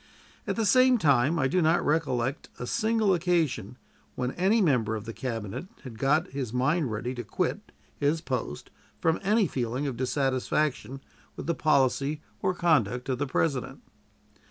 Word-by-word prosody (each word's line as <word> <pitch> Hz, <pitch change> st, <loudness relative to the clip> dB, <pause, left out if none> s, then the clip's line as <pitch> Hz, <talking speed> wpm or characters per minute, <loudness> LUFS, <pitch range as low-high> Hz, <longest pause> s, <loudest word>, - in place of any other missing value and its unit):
At -, -, -1 dB
the 225 Hz, -, 0 dB
same 255 Hz, +4 st, +5 dB
time 145 Hz, -, +3 dB
I 135 Hz, -3 st, +2 dB
do 180 Hz, +6 st, +1 dB
not 165 Hz, +1 st, +2 dB
recollect 135 Hz, -3 st, 0 dB
a 125 Hz, -, -5 dB
single 220 Hz, -, +1 dB
occasion 165 Hz, -, 0 dB, 0.4 s
when 125 Hz, 0 st, -2 dB
any 195 Hz, +8 st, +2 dB
member 125 Hz, -, +2 dB
of 105 Hz, 0 st, -6 dB
the 115 Hz, -, -6 dB
Cabinet 115 Hz, -, -5 dB, 0.2 s
had 120 Hz, -5 st, -9 dB
got 150 Hz, +7 st, +2 dB
his 135 Hz, -5 st, -4 dB
mind 135 Hz, +4 st, +1 dB
ready 115 Hz, +4 st, -3 dB
to 120 Hz, -1 st, -5 dB
quit 105 Hz, -, -3 dB, 0.3 s
his 145 Hz, +3 st, +1 dB
post 125 Hz, -, -4 dB, 0.3 s
from 160 Hz, 0 st, +1 dB
any 210 Hz, +2 st, +3 dB
feeling 125 Hz, -2 st, -2 dB
of 135 Hz, -4 st, -3 dB
dissatisfaction 135 Hz, 0 st, -1 dB, 0.3 s
with -, -, -7 dB
the 170 Hz, -, +1 dB
policy 140 Hz, -1 st, +1 dB, 0.2 s
or 185 Hz, -1 st, 0 dB
conduct 135 Hz, -, +1 dB
of 130 Hz, -1 st, -1 dB
the 145 Hz, -, -1 dB
President. 135 Hz, -1 st, -1 dB
140 Hz, 160 wpm, -27 LUFS, 125-170 Hz, 0.4 s, same